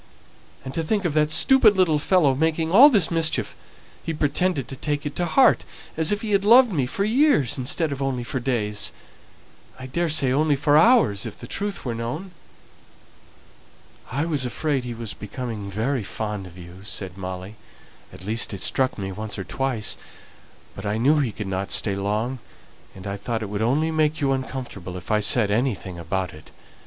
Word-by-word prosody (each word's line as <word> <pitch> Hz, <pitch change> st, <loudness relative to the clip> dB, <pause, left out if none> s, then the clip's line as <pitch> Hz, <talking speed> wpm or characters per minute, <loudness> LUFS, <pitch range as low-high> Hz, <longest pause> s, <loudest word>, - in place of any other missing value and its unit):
And 130 Hz, -, -6 dB
to 165 Hz, -, -1 dB
think 195 Hz, +4 st, -1 dB
of 165 Hz, -, 0 dB
that 150 Hz, 0 st, +2 dB
stupid 215 Hz, -, +5 dB
little 165 Hz, -5 st, +3 dB
fellow 160 Hz, -3 st, +3 dB
making 160 Hz, +3 st, 0 dB
all 255 Hz, +10 st, +9 dB
this 205 Hz, -, +3 dB
mischief! 165 Hz, -1 st, 0 dB, 0.5 s
He 165 Hz, -, -4 dB
pretended 150 Hz, -1 st, 0 dB
to 135 Hz, -, -6 dB
take 145 Hz, +2 st, -3 dB
it 145 Hz, -, -4 dB
to 175 Hz, -, 0 dB
heart, 255 Hz, +7 st, +4 dB, 0.3 s
as 160 Hz, +2 st, +3 dB
if 205 Hz, +1 st, -1 dB
he 215 Hz, -, -3 dB
had 200 Hz, -1 st, +2 dB
loved 240 Hz, +3 st, +6 dB
me 135 Hz, -6 st, 0 dB
for 195 Hz, -, -2 dB
years 225 Hz, -, +3 dB
instead 145 Hz, +4 st, 0 dB
of 140 Hz, 0 st, -5 dB
only 130 Hz, -3 st, -2 dB
for 130 Hz, +2 st, -3 dB
days. 110 Hz, -5 st, -1 dB, 0.9 s
I 130 Hz, -, -9 dB
daresay 150 Hz, -1 st, +2 dB
only 150 Hz, +2 st, +2 dB
for 145 Hz, +1 st, +2 dB
hours 160 Hz, -, +4 dB
if -, -, -9 dB
the -, -, -10 dB
truth 205 Hz, -4 st, -4 dB
were 120 Hz, -, -2 dB
told." 120 Hz, +12 st, -5 dB, 1.8 s
"I 140 Hz, +5 st, -1 dB
was 150 Hz, -5 st, 0 dB
afraid 135 Hz, +1 st, -2 dB
he 120 Hz, -1 st, -5 dB
was 115 Hz, -2 st, -6 dB
becoming 105 Hz, -1 st, -6 dB
very 115 Hz, +5 st, -2 dB
fond 105 Hz, -2 st, -5 dB
of 90 Hz, 0 st, -15 dB
you," 85 Hz, 0 st, -12 dB
said 95 Hz, -3 st, -5 dB
Molly; 95 Hz, +2 st, -7 dB, 0.6 s
"at 95 Hz, -, -12 dB
least 110 Hz, 0 st, -1 dB
it 95 Hz, -, -7 dB
struck 130 Hz, +4 st, +1 dB
me 95 Hz, -1 st, -4 dB
once 105 Hz, +1 st, -5 dB
or 95 Hz, -, -4 dB
twice; 115 Hz, +3 st, -2 dB, 0.8 s
but 95 Hz, -, -8 dB
I 105 Hz, 0 st, -2 dB
knew 145 Hz, +7 st, +3 dB
he 130 Hz, -6 st, 0 dB
could 105 Hz, -, -6 dB
not 95 Hz, 0 st, -3 dB
stay 100 Hz, -, +2 dB
long, 105 Hz, +6 st, -2 dB, 0.6 s
and 95 Hz, -, -11 dB
I 100 Hz, 0 st, -4 dB
thought 115 Hz, +2 st, -3 dB
it 105 Hz, -, -6 dB
would 105 Hz, +1 st, -3 dB
only 145 Hz, +8 st, +1 dB
make 155 Hz, -1 st, +1 dB
you 140 Hz, -2 st, +1 dB
uncomfortable 130 Hz, -9 st, -5 dB
if 90 Hz, -, -8 dB
I 105 Hz, -, +3 dB
said 105 Hz, 0 st, +3 dB
anything 105 Hz, -6 st, -2 dB
about 85 Hz, +1 st, -3 dB
it. 75 Hz, 0 st, -14 dB
130 Hz, 190 wpm, -23 LUFS, 105-160 Hz, 1.8 s, all